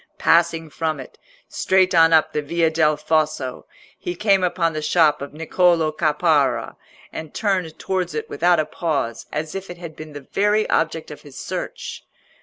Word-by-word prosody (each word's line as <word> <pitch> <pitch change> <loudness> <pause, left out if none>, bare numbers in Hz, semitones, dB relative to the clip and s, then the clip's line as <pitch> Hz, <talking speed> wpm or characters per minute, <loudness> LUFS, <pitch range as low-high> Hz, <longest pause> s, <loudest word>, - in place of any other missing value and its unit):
Passing 165 -2 +2
from 155 -2 -2
it, 130 - -11 0.3
straight 185 -1 +2
on 165 -1 +6
up 160 -1 +4
the 150 - 0
Via 165 +2 +1
del 155 -2 +2
Fosso, 155 -4 -1 0.3
he 175 - -4
came 195 -1 +2
upon 170 -2 +1
the 155 - -3
shop 150 -2 +3
of 140 - -6
Niccolò 165 0 +1
Caparra, 155 -3 +1 0.4
and 160 -2 -7
turned 185 -7 -1
towards 185 -1 -2
it 450 0 -3
without 180 - +2
a 155 - +1
pause, 140 -9 -3
as 155 +1 -4
if 195 0 -6
it 175 - -8
had 170 -3 -9
been 155 -1 -10
the 145 -2 -10
very 210 +1 +2
object 160 -1 0
of 150 - -10
his 145 -3 -14
search. - - -6
160 Hz, 175 wpm, -21 LUFS, 150-175 Hz, 0.4 s, on